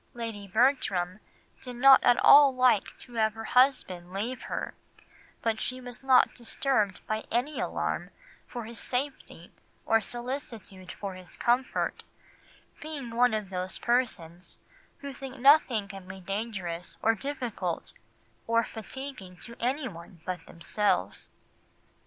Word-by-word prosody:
"Lady 225 -4 -5
Bertram 205 -5 +1 0.4
did 250 -1 -6
not 265 +2 +7
at 240 - +5
all 280 -2 +9
like 250 -5 +3
to 245 - -13
have 220 -2 +1
her 225 - -6
husband 235 -10 +2
leave 225 +7 -3
her; - - -3 0.7
but 225 -2 0
she 255 0 -2
was 245 -1 -8
not 265 -1 +5
disturbed 235 -4 0
by 215 0 -2
any 255 +6 -1
alarm - - -2 0.4
for 240 -3 -6
his 230 +1 -9
safety 265 +3 -4 0.3
or 225 0 +4
solicitude 240 -5 -6
for 200 -2 -6
his 185 -1 -12
comfort, 245 +2 0 0.8
being 295 -6 -6
one 240 0 +3
of 210 -3 -4
those 185 0 -3
persons 195 -8 -1 0.4
who 280 -1 -6
think 270 0 -8
nothing 260 -6 +5
can 195 -2 -10
be 190 +1 -8
dangerous 190 -3 -4
or 225 - +5
difficult 230 - -4 0.5
or 230 0 +3
fatiguing 220 -4 -8
to 235 - -10
anyone 235 - -3
but 180 -2 -4
themselves." 205 +5 -1
230 Hz, 130 wpm, -28 LUFS, 195-255 Hz, 0.8 s, all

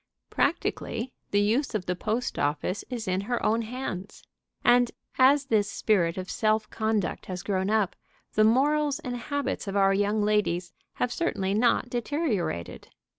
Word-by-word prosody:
Practically 240 +3 -1 0.2
the 205 - +2
use 230 +5 +1
of 190 -4 -2
the 180 - -1
post 220 +6 -2
office 150 +7 -1
is 240 -5 -4
in 185 +1 0
her 240 +4 -2
own 225 +2 +2
hands. 220 -5 -6 0.4
And, 245 0 +5 0.3
as 275 +2 +5
this 215 -5 +1
spirit 180 -6 +1
of 185 0 -4
self 215 +1 +1
conduct 220 -3 -1
has 180 -1 -5
grown 190 -1 0
up, 215 -4 +1 0.4
the 215 - +4
morals 285 +5 +3
and 245 -1 -5
habits 285 -1 -3
of 195 - -3
our 195 -1 +4
young 205 +2 +1
ladies 185 -5 0 0.2
have 245 -1 -1
certainly 200 - -1
not 235 +3 +2
deteriorated. 240 - -2
215 Hz, 155 wpm, -27 LUFS, 195-245 Hz, 0.4 s, And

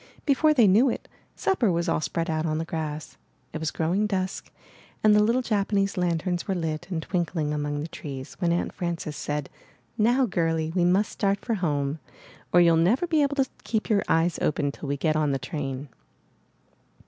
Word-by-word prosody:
Before 305 +2 +4
they 250 -7 +5
knew 215 +7 +5
it, - - -4 0.3
supper 250 - +1
was 170 +1 0
all 165 - +1
spread 165 +2 -2
out 155 -1 -1
on 155 0 0
the 165 - -2
grass. 155 -2 -5 0.4
It 155 - -3
was 160 -1 -1
growing 180 +6 0
dusk, 190 -2 -3 0.5
and 215 -1 +6
the 210 - +6
little 235 +4 +2
Japanese 200 -3 0
lanterns 175 0 -1
were 195 - 0
lit 165 -1 -3
and 165 -4 -3
twinkling 165 -4 -1
among 145 0 -2
the 155 - -4
trees, 135 -4 -7
when 175 -3 +1
Aunt 170 - -1
Frances 170 -3 -3
said: 145 -1 -3 0.5
*'Now, 245 +5 +4
girlie, 165 -5 0
we 175 -2 +3
must 190 +4 +2
start 200 -1 -1
for 235 - 0
home, 150 -6 -1 0.5
or 175 - +6
you'll 170 -1 +5
never 210 - +3
be 320 -3 +2
able 285 0 +1
to 270 -2 +3 0.2
keep 220 -1 -2
your 200 -2 +4
eyes 165 +1 +2
open 145 -2 +1
till 140 0 -8
we 140 - -1
get 155 +2 +1
on 150 -2 +1
the - - +1
train." 135 -1 -5
170 Hz, 195 wpm, -26 LUFS, 155-205 Hz, 0.5 s, and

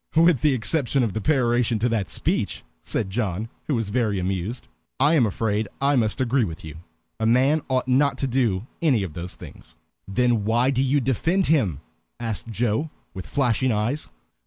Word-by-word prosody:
"With 165 -5 +5
the 150 -3 +3
exception 130 +1 +1
of 110 -5 -1
the 110 - -3
peroration 120 -4 +2
to 115 +3 +1
that 105 -6 -1
speech," 85 - -1 0.2
said 95 - -2
John, 105 0 -2 0.2
who 145 - +1
was 115 -4 -2
very 110 -2 0
much 95 - -1
amused, 95 +6 -3 0.3
"I 145 +4 +4
am 130 -8 +4
afraid 105 +1 -1
I 140 +1 +2
must 110 -4 +1
agree 130 0 +2
with 80 -5 -5
you. 80 -1 -8 0.4
A 110 - +1
man 130 +6 +4
certainly - - -18
ought 130 0 0
not 135 +2 +3
to - - -1
do 120 -6 0 0.2
any 135 -11 +3
of 90 -5 -5
those 85 +2 -6
things." - - -13 0.3
"Then 115 +2 +1
why 120 +5 +2
do 130 -1 +1
you 135 +2 +2
defend 165 - +1
him?" 105 - +1 0.4
asked 115 -2 -3
Joe, 115 +7 0 0.2
with 95 - -7
flashing 130 -2 +1
eyes. 115 +8 -1
120 Hz, 190 wpm, -24 LUFS, 105-135 Hz, 0.4 s, With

